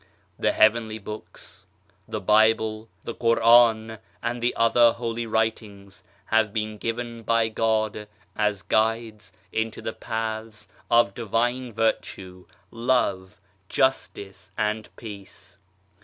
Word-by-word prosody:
The - - +2
Heavenly 110 0 +3
Books, 105 0 -10 0.4
the - - -4
Bible, 110 0 +2
the 115 - -5
Quran, 115 -1 +4 0.2
and 120 0 -2
the 120 +1 0
other 115 0 +5
Holy 115 0 -4
Writings 110 -3 -3 0.2
have 110 -1 +2
been 110 0 -3
given 115 +1 -4
by 115 0 +2
God 110 -1 -1 0.3
as 105 -2 0
guides 110 -3 0 0.2
into 110 0 -2
the 110 - -4
paths 110 0 -5 0.2
of 115 -4 +4
Divine 120 +3 -1
Virtue, 95 -5 -2 0.2
Love, 115 -6 0 0.3
Justice 100 -7 -1
and 110 0 -1
Peace. 100 -4 -11
110 Hz, 110 wpm, -25 LUFS, 105-115 Hz, 0.4 s, other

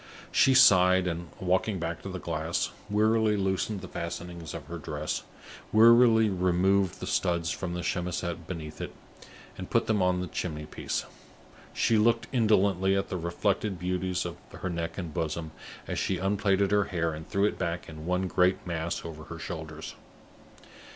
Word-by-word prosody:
She 135 - +5
sighed, 95 -7 +6
and, 85 -1 -3
walking 95 +3 +1
back 85 -1 -4
to 100 - -6
the 95 - -4
glass, 80 -1 -2 0.2
wearily 110 +1 +3
loosened 95 +1 -1
the - - -7
fastenings 85 -1 -6
of - - -7
her 85 0 -7
dress; 75 +1 -3 0.5
wearily 115 0 +7
removed 95 0 +2
the - - -5
studs 85 -3 0
from 90 -2 -4
the 90 - -3
chemisette 85 -1 -3
beneath 80 -4 -6
it, - - -6 0.6
and - - -6
put - - +2
them 105 -3 +1
on 90 0 +2
the 90 - -2
chimney 75 -3 -4
piece. - - -3 0.7
She 115 -2 +2
looked 115 +2 +3
indolently 100 -5 +3
at 95 - -2
the 90 - -2
reflected 90 +3 -1
beauties 90 +1 -1
of 85 0 -5
her 95 - -5
neck 85 -1 -4
and 85 -5 -5
bosom, 80 -1 -3 0.4
as - - -2
she 95 - 0
unplaited 100 +1 +1
her 105 -1 +3
hair 85 -4 -1
and 80 +1 -8
threw 100 +1 +2
it 105 - -1
back 85 -1 -2
in 80 0 -9
one 90 +1 +1
great 90 +1 +2
mass 85 -1 -3
over 80 -1 -8
her 85 - -8
shoulders. 80 -2 -6
90 Hz, 170 wpm, -28 LUFS, 85-100 Hz, 0.7 s, wearily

